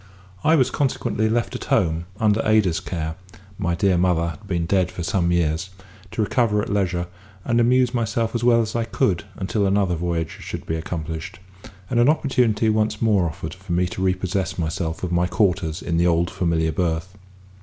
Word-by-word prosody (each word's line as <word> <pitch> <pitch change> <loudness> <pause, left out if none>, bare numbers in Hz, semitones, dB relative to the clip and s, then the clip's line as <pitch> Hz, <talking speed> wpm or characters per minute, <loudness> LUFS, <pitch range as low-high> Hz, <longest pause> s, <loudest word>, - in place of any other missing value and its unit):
I 160 - +5
was 130 -4 +3
consequently 120 -5 0
left 115 +1 0
at - - -5
home 80 +1 +1
under 110 0 +3
Ada's 105 -6 +3
care 80 -2 -4 0.5
(my 85 -3 0
dear 90 0 +2
mother 85 -2 +2
had 90 +6 -10
been 85 -3 -1
dead 95 +1 +1
some 85 -2 +1
years), 85 +1 0 0.4
to 110 - -1
recover 105 -1 +1
at 105 - -2
leisure, 90 -3 0 0.4
and 120 0 +2
amuse 125 +1 +3
myself 115 -1 -1
as 120 -1 -2
well 120 -1 +5
as 110 - -5
I 115 - +1
could 105 -4 0
until 100 +1 0
another 95 -2 +2
voyage 85 -1 -2
should - - -6
be 80 - -2
accomplished, 80 -1 -5 0.5
and 120 - 0
an 120 +4 +5
opportunity 125 -8 +2
once 110 0 +1
more 100 -7 +2
offered 80 0 -6
for 95 -1 -6
me 90 +1 +2
to 95 - -5
repossess 95 -1 -1
myself 80 0 -3
of 90 - -2
my 85 0 +2
quarters 90 -3 0
in 85 -1 -1
the 85 +1 +3
old 85 0 +2
familiar 80 -2 0
berth. 85 +3 -2
95 Hz, 185 wpm, -22 LUFS, 85-110 Hz, 0.5 s, I